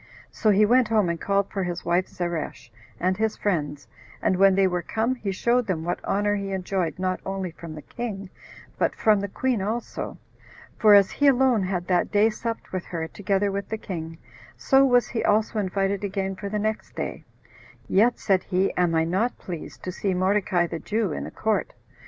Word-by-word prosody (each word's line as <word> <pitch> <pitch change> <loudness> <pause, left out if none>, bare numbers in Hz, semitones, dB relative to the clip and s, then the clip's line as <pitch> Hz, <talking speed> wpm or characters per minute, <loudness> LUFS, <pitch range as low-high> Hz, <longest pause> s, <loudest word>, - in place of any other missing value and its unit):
So 215 - +1
he 210 +1 +5
went 245 +2 +4
home 210 -5 +2
and 170 -1 -3
called 200 0 0
for 195 - -2
his 175 -1 -4
wife 175 +2 +1
Zeresh, 170 -8 -4 0.3
and 185 +1 +1
his 220 0 0
friends, 150 -7 -2 0.3
and 185 - +1
when 195 +1 +5
they 195 0 +4
were 180 -1 0
come, 225 +7 -1
he 215 -6 -4
showed 240 +5 +1
them 170 -5 -1
what 175 +1 -3
honor 205 +1 +1
he 200 -1 -4
enjoyed 185 -2 -2
not 185 0 -1
only 190 -2 -3
from 165 -1 -9
the 150 - -9
king, 200 -6 -6 0.5
but - - +1
from 215 -2 +3
the 200 - -2
queen 245 +2 -1
also, 220 +5 -4 0.6
for 210 -2 +6
as 200 -1 +5
he 290 - +2
alone 260 -4 +4
had 185 -2 -2
that 180 -1 +1
day 215 +2 +4
supped 230 +1 -5
with 185 -2 -3
her, 165 -2 -4
together 200 +2 0
with 200 0 -4
the 220 - -2
king, 165 -5 -6 0.4
so 270 -1 +4
was 245 -2 +4
he 230 - -2
also 215 +1 +2
invited 195 0 -1
again 195 -1 -2
for 200 +1 -6
the 210 - -2
next 215 +1 -3
day; - - -4 0.6
"yet," 230 +5 +3
said 190 -3 +2
he, 190 0 +1
"am 175 -2 +2
I 160 - +3
not 190 +9 0
pleased 175 -4 -8
to 185 - -3
see 190 +1 -1
Mordecai 185 -1 +2
the 165 -1 -5
Jew 215 -2 -1
in - - -4
the - - -6
court." 220 -1 -1
195 Hz, 200 wpm, -25 LUFS, 180-215 Hz, 0.6 s, for